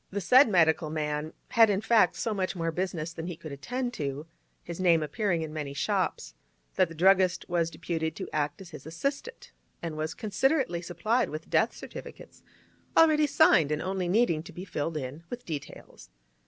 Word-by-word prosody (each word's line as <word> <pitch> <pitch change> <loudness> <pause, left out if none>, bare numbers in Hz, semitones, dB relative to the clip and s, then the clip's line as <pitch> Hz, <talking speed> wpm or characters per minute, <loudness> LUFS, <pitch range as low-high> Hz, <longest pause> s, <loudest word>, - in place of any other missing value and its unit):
The 200 - -3
said 250 +7 +6
medical 160 -4 +3
man 150 0 -2 0.2
had, 225 -2 +5
in 195 -1 +1
fact, 220 -4 +3
so 225 - -2
much 190 -1 -2
more 165 -1 -1
business 170 -2 -3
than 165 0 -6
he 175 - -5
could 155 - -9
attend 245 - -4
to—his 155 +4 -7
name 170 -4 +4
appearing 170 +2 -1
in 155 -1 -6
many 145 -3 -5
shops—that - - -2
the 165 - -10
druggist 185 +1 +3
was 170 -2 0
deputed 160 -2 -3
to - - -6
act 150 +3 -1
as 180 -3 -11
his 150 -2 -10
assistant, 275 - -4 0.3
and 165 -2 -5
was 155 +1 -3
considerately 220 - 0
supplied 215 +8 0
with 155 +1 -7
death - - +2
certificates, - - -10 0.6
already 310 -2 +5
signed, 165 - +4
and 150 +1 -1
only 185 0 -2
needing 180 -4 +2
to 180 +3 -11
be 180 +3 -8
filled 160 -2 -3
in 140 +3 -6
with 245 0 -7
details. 145 - -8
170 Hz, 175 wpm, -28 LUFS, 155-200 Hz, 0.6 s, said